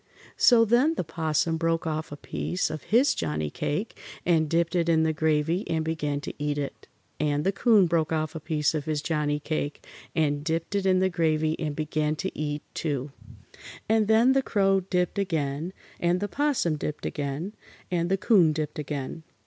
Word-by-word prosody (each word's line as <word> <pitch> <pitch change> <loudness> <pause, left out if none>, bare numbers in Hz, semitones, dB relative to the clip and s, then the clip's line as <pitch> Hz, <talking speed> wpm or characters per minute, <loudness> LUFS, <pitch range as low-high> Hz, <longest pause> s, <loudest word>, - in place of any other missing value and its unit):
So 230 -3 +6
then 250 +9 +3
the - - -1
'Possum 160 0 0
broke 165 0 0
off 155 -1 -3
a 145 - -6
piece 180 +4 -2
of 155 -2 -6
his 240 +9 +4
Johnnie 75 -1 -2
cake 195 +10 -3 0.3
and 160 -3 +3
dipped 170 +2 +1
it 170 -1 +2
in 160 -1 +4
the 160 0 +1
gravy 160 +4 +1
and 160 -1 0
began 150 -3 -1
to - - -6
eat 145 0 -1
it, 140 -1 -5 0.3
and 145 0 +1
the 195 - +2
'Coon 210 -1 +4
broke 165 -2 +1
off 155 0 -1
a 160 - -5
piece 150 -1 0
of 150 -2 -2
his 155 -1 -2
Johnnie 150 -2 0
cake 150 -1 -3 0.3
and 145 -2 +1
dipped 165 +4 -2
it 200 -1 +1
in 185 -1 +4
the 190 - +3
gravy 160 -2 +1
and 150 -3 -2
began 155 0 -1
to 190 +5 -4
eat, 150 -1 -3
too. 145 -3 -2 0.8
And 220 -1 +3
then 225 +4 +5
the 270 - +3
Crow 195 -5 +2
dipped 180 0 -1
again, 160 -3 -1 0.3
and 175 +1 +2
the 205 - -2
'Possum 270 - 0
dipped 150 0 -4
again, 145 +7 -3 0.4
and 170 -1 0
the 195 - +2
'Coon 185 -7 +4
dipped 150 -1 -3
again. 145 +1 -4
160 Hz, 190 wpm, -26 LUFS, 150-185 Hz, 0.8 s, So